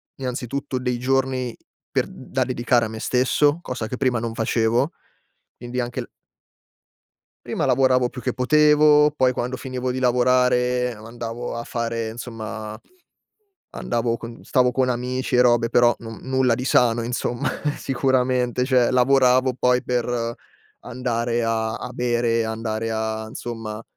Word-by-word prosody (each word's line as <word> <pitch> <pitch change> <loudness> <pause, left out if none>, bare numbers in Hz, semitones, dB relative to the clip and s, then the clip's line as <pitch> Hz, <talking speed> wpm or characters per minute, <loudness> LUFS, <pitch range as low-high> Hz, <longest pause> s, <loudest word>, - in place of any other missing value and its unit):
innanzitutto 130 +1 -4
dei 125 -1 -1
giorni 130 -1 0 0.4
per - - 0
da 95 - -3
dedicare 120 -2 +1
a - - -3
me 110 0 -7
stesso, 140 +6 +2
cosa 125 -7 -4
che 125 - -5
prima 125 -3 +1
non 115 -1 -4
facevo; 115 +5 +1 0.7
quindi 125 +1 -4
anche 120 0 -3
il - - -8 1.4
Prima - - -1
lavoravo 130 -1 +3
più 125 - -9
che 125 - -2
potevo, 150 +2 +5
poi 130 -2 +3
quando 125 +1 -3
finivo 130 -1 -4
di 130 - -3
lavorare 125 0 +2
andavo 115 +2 -6
a 115 - -4
fare, 115 -2 -3
insomma 110 -2 -7 1.0
andavo 115 0 -1
con 115 0 -10
stavo 125 -1 +2
con 130 0 +1
amici 125 +1 -2
e 125 - +6
robe, 120 -1 +3
però 120 0 +4
non 115 -1 -8
nulla 130 -2 +2
di 125 - -4
sano 120 -3 +3
insomma, 120 +3 -2 0.3
sicuramente; 125 -1 +1
cioè 125 -3 +3
lavoravo 130 0 +4
poi 125 0 +2
per 120 -1 -1 0.5
andare 120 -1 -2
a 110 0 -1
a 125 +1 -6
bere, 120 -2 +1
andare 110 0 -3
a 110 0 -3
insomma 115 -3 -6
125 Hz, 140 wpm, -22 LUFS, 115-130 Hz, 1.4 s, e